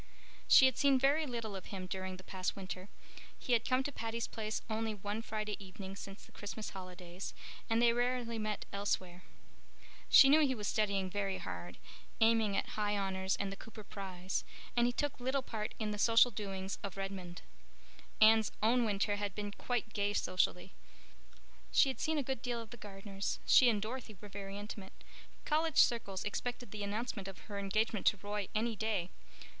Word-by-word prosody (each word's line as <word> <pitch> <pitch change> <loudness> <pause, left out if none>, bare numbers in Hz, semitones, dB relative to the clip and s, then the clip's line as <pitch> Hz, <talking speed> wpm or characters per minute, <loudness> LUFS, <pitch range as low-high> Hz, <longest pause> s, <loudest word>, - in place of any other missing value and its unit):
She 265 - +9
had 260 -2 +3
seen 280 -2 +5
very 285 +4 +3
little 230 -5 -4
of 190 - -7
him 190 -2 -5
during 185 0 -4
the 185 - -12
past 185 -1 -3
winter. 190 0 -6 0.5
He 250 - -1
had 230 -1 +4
come 255 +1 +2
to 285 - -3
Patty's 230 -2 -3
Place 215 -1 -4
only 220 -1 -1
one 205 +2 -3
Friday 215 -2 -4
evening 195 0 -8
since 195 0 -9
the - - -19
Christmas 210 +1 -6
holidays, 185 -1 -7 0.3
and 225 0 +3
they 235 0 +5
rarely 240 -1 0
met 215 -1 -2
elsewhere. 185 -3 -1 0.9
She 275 - +10
knew 295 +3 +7
he 275 -4 +3
was 210 -3 -3
studying 200 -3 +1
very 195 -1 -1
hard, 90 -1 -6 0.4
aiming 225 -3 +4
at - - -1
High 210 -1 0
Honors 190 -1 0
and 200 -1 -2
the - - -5
Cooper 220 +1 -11
Prize, 190 -2 -4 0.3
and 240 0 +4
he - - +2
took 290 +3 -2
little 260 +2 0
part 215 -4 -4
in 215 -1 -2
the 210 - -4
social 230 +3 +6
doings 195 -2 -4
of 195 -1 -6
Redmond. 190 -2 -5 0.8
Anne's 220 0 +6
own 240 +3 +4
winter 205 -1 +1
had 205 -2 -3
been 205 -1 -3
quite 240 +1 -2
gay 205 0 +1
socially. 185 -1 0 1.0
She 275 - +5
had 260 - -4
seen 315 0 0
a 290 - +1
good 265 -2 -3
deal 240 -2 -2
of 225 -2 -9
the - - -7
Gardners; 195 -2 -4
she 255 - +7
and 215 -3 +2
Dorothy 220 0 -5
were 210 - -10
very 195 0 -6
intimate; 205 -2 -7 0.5
college 315 0 +1
circles 200 -5 +3
expected 245 +1 -4
the 215 - -5
announcement 205 0 -3
of 195 - -7
her 200 - -2
engagement 215 +2 0
to 205 - +5
Roy 205 0 -3
any 225 +1 +1
day. 205 -5 -1
210 Hz, 185 wpm, -35 LUFS, 195-235 Hz, 1.0 s, She